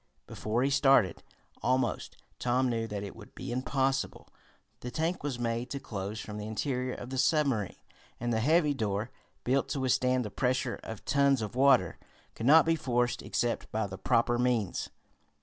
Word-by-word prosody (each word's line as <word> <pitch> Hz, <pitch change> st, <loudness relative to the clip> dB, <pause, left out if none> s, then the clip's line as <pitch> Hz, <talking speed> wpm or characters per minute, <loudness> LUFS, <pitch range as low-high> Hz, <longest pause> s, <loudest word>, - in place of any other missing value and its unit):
Before 115 Hz, +4 st, -2 dB
he 140 Hz, -, +1 dB
started, 135 Hz, -, +4 dB, 0.4 s
almost, 125 Hz, -1 st, 0 dB, 0.2 s
Tom 125 Hz, +1 st, +1 dB
knew 115 Hz, -1 st, -1 dB
that 105 Hz, -2 st, -4 dB
it 100 Hz, -, -7 dB
would 105 Hz, -2 st, -14 dB
be 130 Hz, -, -6 dB
impossible. 135 Hz, +2 st, -1 dB, 0.5 s
The 125 Hz, -, -6 dB
tank 165 Hz, +7 st, -1 dB
was 140 Hz, -4 st, -3 dB
made 120 Hz, +1 st, -2 dB
to 140 Hz, -, -4 dB
close 100 Hz, -2 st, -5 dB
from 105 Hz, 0 st, -6 dB
the 105 Hz, -, -5 dB
interior 125 Hz, +3 st, -2 dB
of 125 Hz, -, -8 dB
the 130 Hz, -, -2 dB
submarine, 135 Hz, -, +2 dB, 0.4 s
and 120 Hz, 0 st, -1 dB
the 110 Hz, -, +1 dB
heavy 150 Hz, +4 st, +3 dB
door, 110 Hz, -2 st, -2 dB, 0.3 s
built 130 Hz, +2 st, +1 dB
to 140 Hz, -, -2 dB
withstand 130 Hz, -1 st, +2 dB
the 105 Hz, -, -6 dB
pressure 130 Hz, 0 st, 0 dB
of 110 Hz, -2 st, -8 dB
tons 140 Hz, -4 st, +3 dB
of 105 Hz, -, -5 dB
water, 130 Hz, -, +4 dB, 0.3 s
could 115 Hz, -, -3 dB
not 160 Hz, +3 st, +8 dB
be 165 Hz, 0 st, +3 dB
forced 125 Hz, -5 st, 0 dB
except 120 Hz, 0 st, -2 dB
by 110 Hz, 0 st, 0 dB
the 95 Hz, -1 st, -7 dB
proper 120 Hz, +3 st, +2 dB
means. 120 Hz, -6 st, 0 dB
125 Hz, 175 wpm, -30 LUFS, 110-135 Hz, 0.5 s, not